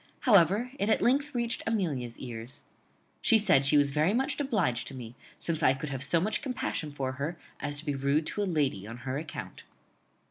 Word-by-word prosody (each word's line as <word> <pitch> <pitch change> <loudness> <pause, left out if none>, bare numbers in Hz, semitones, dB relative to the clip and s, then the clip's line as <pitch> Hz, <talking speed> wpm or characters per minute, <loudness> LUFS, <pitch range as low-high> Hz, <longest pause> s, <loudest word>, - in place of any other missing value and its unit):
However, 205 - +4
it 200 - +1
at - - +2
length 280 +3 +2
reached 235 -1 -1
Amelia's 150 - -1
ears. 120 0 -6 0.6
She 225 - +5
said 185 -10 +4
she 150 - +6
was 145 -1 +4
very 155 +9 +2
much 270 +4 0
obliged 200 - 0
to 135 - -5
me, 120 -3 -8 0.2
since 165 -1 -2
I 135 -3 +4
could 145 +3 -5
have 135 -1 -3
so 160 +4 +3
much 215 +6 -1
compassion 240 - -3
for 135 -2 -3
her 145 +6 -4 0.2
as 145 0 0
to 150 - -5
be 145 - -1
rude 140 +3 +1
to 205 - -2
a - - +1
lady 135 - 0
on 115 +2 -7
her 130 +2 -2
account. 155 -1 -7
155 Hz, 205 wpm, -29 LUFS, 135-210 Hz, 0.6 s, she